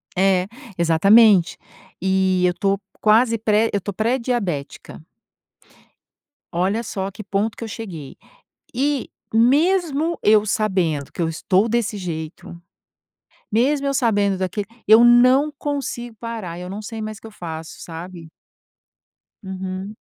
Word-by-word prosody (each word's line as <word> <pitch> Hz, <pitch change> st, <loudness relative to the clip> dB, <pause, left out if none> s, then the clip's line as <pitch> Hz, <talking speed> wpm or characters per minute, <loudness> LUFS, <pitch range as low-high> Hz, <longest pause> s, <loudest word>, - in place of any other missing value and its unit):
É, 185 Hz, 0 st, +2 dB, 0.3 s
exatamente. 185 Hz, +3 st, +5 dB, 0.4 s
E 190 Hz, -1 st, +2 dB
eu 180 Hz, -, +3 dB
estou 195 Hz, +2 st, 0 dB, 0.2 s
quase 225 Hz, +2 st, +4 dB
pré 220 Hz, +1 st, +2 dB
eu -, -, +2 dB
estou 200 Hz, +1 st, -6 dB
pré-diabética. 220 Hz, -, -2 dB, 1.5 s
Olha 195 Hz, +7 st, 0 dB
só 195 Hz, -3 st, -4 dB
a -, -, -7 dB
que 215 Hz, -, -9 dB
ponto 205 Hz, +3 st, -1 dB
que -, -, -7 dB
eu -, -, -5 dB
cheguei. 185 Hz, -, -8 dB, 0.6 s
E 275 Hz, +1 st, -1 dB, 0.2 s
mesmo 310 Hz, +6 st, +2 dB
eu 210 Hz, 0 st, +5 dB
sabendo 185 Hz, -10 st, -1 dB
que -, -, -5 dB
eu 165 Hz, -, +1 dB
estou 185 Hz, +5 st, +1 dB
desse 225 Hz, -2 st, -1 dB
jeito, 160 Hz, -2 st, -6 dB, 1.0 s
mesmo 275 Hz, +6 st, +1 dB
eu 275 Hz, -, -1 dB
sabendo 205 Hz, -6 st, +1 dB
daquele 190 Hz, +2 st, -3 dB, 0.2 s
eu 220 Hz, +2 st, +7 dB
não 255 Hz, +5 st, +5 dB
consigo 255 Hz, -5 st, -4 dB
parar, 220 Hz, -8 st, -6 dB
eu 180 Hz, +1 st, -7 dB
não 200 Hz, -, -5 dB
sei 225 Hz, +1 st, -6 dB
mais 215 Hz, -1 st, -6 dB
o -, -, -24 dB
que -, -, -10 dB
eu -, -, -10 dB
faço, 165 Hz, -5 st, -8 dB
sabe? 170 Hz, 0 st, -9 dB, 1.1 s
Uhum. 190 Hz, +2 st, -6 dB
205 Hz, 135 wpm, -21 LUFS, 185-230 Hz, 1.5 s, eu